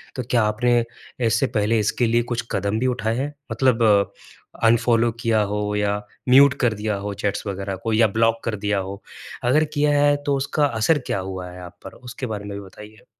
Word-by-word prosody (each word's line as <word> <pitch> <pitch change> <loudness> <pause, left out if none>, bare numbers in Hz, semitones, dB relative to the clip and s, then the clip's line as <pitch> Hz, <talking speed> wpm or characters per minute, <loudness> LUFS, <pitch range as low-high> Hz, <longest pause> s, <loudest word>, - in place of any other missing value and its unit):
तो 130 - -3
क्या 120 -3 +3
आपने 120 +3 +2 0.4
इससे 115 0 +2
पहले 110 +2 +2
इसके 110 +3 +1
लिए 120 +1 +2
कुछ 115 0 -2
कदम 100 +2 -1
भी 130 - +1
उठाए 115 -3 -1
हैं, 145 +3 -3 0.2
मतलब 115 -6 +3 0.5
अनफॉलो 115 0 +3
किया 115 -3 +2
हो 105 0 -2
या 105 0 0 0.3
म्यूट 135 +1 +7
कर 120 -4 +2
दिया 105 0 -2
हो 105 - -3
चैट्स 100 +1 -1
वगैरह 100 0 -4
को 115 -1 -1
या 110 0 +4
ब्लॉक 115 +2 +1
कर 115 - -1
दिया 105 0 -1
हो? 95 +1 -6 0.4
अगर 135 +6 +3
किया 145 0 +2
है 145 0 +4
तो 145 - +1
उसका 140 +2 0
असर 135 +4 +1
क्या - - -1
हुआ 95 -1 -6
है 90 0 -10
आप 90 - -12
पर, - - -8
उसके 125 +1 -8
बारे 105 -2 -5
में 100 -1 -6
भी 100 - -10
बताइए। 105 +2 -14
110 Hz, 205 wpm, -22 LUFS, 105-120 Hz, 0.5 s, म्यूट